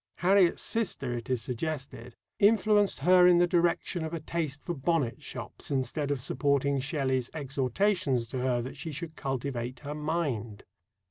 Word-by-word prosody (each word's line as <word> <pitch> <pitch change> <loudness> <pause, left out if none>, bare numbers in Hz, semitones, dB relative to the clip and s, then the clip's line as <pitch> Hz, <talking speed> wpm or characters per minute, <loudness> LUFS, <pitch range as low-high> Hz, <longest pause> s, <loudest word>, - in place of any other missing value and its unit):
Harriet's 185 -1 +3
sister, 225 - -1
it 120 0 -5
is 125 -3 0
suggested, 130 -3 -5 0.2
influenced 205 -4 +3
her 180 +3 +6
in 175 -1 +6
the 175 - +5
direction 175 -1 +1
of 160 +1 -3
a - - -3
taste 155 -2 -3
for 175 - -3
bonnet 145 -4 0
shops - - -7
instead 140 +2 -1
of 145 -2 0
supporting 140 +1 +1
Shelley's 130 -3 -1
exhortations 140 - 0
to 130 - -3
her 125 -1 0
that 130 - -7
she 160 +3 -5
should 160 +2 -6
cultivate 130 -2 -4
her 145 0 -5
mind. 150 -9 -2
145 Hz, 155 wpm, -29 LUFS, 130-170 Hz, 0.2 s, her